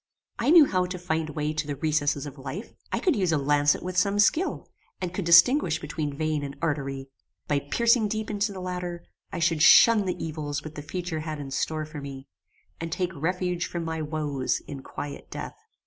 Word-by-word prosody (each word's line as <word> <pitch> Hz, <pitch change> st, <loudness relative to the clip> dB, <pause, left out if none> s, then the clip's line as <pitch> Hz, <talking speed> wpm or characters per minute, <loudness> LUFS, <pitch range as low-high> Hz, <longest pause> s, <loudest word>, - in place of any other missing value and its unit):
I 235 Hz, +4 st, +1 dB
knew 325 Hz, -2 st, +9 dB
how 185 Hz, -6 st, 0 dB
to 180 Hz, 0 st, -5 dB
find 160 Hz, -3 st, -2 dB
way 150 Hz, 0 st, -2 dB
to 150 Hz, -1 st, -2 dB
the 145 Hz, -, -3 dB
recesses 145 Hz, -1 st, 0 dB
of 145 Hz, -1 st, -9 dB
life. 145 Hz, -, -7 dB, 0.2 s
I -, -, 0 dB
could 365 Hz, -, +2 dB
use 185 Hz, -5 st, +1 dB
a 155 Hz, -, +3 dB
lancet 145 Hz, +1 st, +2 dB
with 185 Hz, 0 st, -4 dB
some 200 Hz, +3 st, +2 dB
skill, 310 Hz, -, +2 dB, 0.3 s
and 180 Hz, -2 st, -4 dB
could 185 Hz, -1 st, -3 dB
distinguish 170 Hz, -, +6 dB
between 150 Hz, -2 st, -4 dB
vein 155 Hz, -1 st, 0 dB
and 140 Hz, -1 st, -6 dB
artery. 135 Hz, -3 st, -2 dB, 0.4 s
By 145 Hz, -1 st, +2 dB
piercing 230 Hz, -, +2 dB
deep 215 Hz, +1 st, -3 dB
into 205 Hz, 0 st, 0 dB
the 190 Hz, -2 st, -7 dB
latter, 180 Hz, -1 st, -5 dB, 0.3 s
I -, -, -4 dB
should 165 Hz, -2 st, +1 dB
shun 220 Hz, +4 st, +7 dB
the 180 Hz, -, -2 dB
evils 150 Hz, -2 st, -4 dB
which 155 Hz, -, -8 dB
the 150 Hz, -, -7 dB
future 175 Hz, +1 st, -4 dB
had 155 Hz, -1 st, -5 dB
in 140 Hz, -2 st, -7 dB
store 155 Hz, +3 st, -1 dB
for 150 Hz, -1 st, -8 dB
me, 135 Hz, -1 st, -8 dB, 0.5 s
and 165 Hz, 0 st, -5 dB
take 180 Hz, +1 st, -2 dB
refuge 180 Hz, +2 st, -1 dB
from 170 Hz, -1 st, -4 dB
my 160 Hz, 0 st, -3 dB
woes 150 Hz, -4 st, -1 dB
in 140 Hz, -2 st, -8 dB
quiet 145 Hz, +2 st, -7 dB
death. -, -, -6 dB
160 Hz, 205 wpm, -26 LUFS, 145-185 Hz, 0.5 s, knew